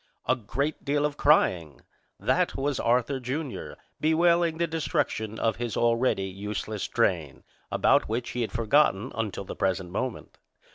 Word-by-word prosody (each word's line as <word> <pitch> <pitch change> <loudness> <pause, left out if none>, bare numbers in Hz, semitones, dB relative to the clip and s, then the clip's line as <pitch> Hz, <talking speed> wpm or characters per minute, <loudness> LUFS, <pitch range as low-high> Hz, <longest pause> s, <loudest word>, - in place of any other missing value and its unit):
A 130 - +3
great 130 +6 -3
deal 145 +1 +1
of 150 -1 -1
crying! 90 - +2 0.4
That - - +1
was 140 0 -1
Arthur, 125 +3 +1
Jr., 130 +2 -4 0.3
bewailing 170 +1 +3
the 170 - +1
destruction 110 -9 -2
of 110 -1 0
his 120 -1 -3
already 115 -3 +2
useless 105 +2 -4
train, 80 -7 0 0.3
about - - +3
which 120 +2 -2
he 125 - -3
had 115 - -2
forgotten 115 -1 +2
until 105 -3 -3
the - - -7
present 95 -2 -1
moment. 125 +5 -4
120 Hz, 145 wpm, -27 LUFS, 105-145 Hz, 0.4 s, A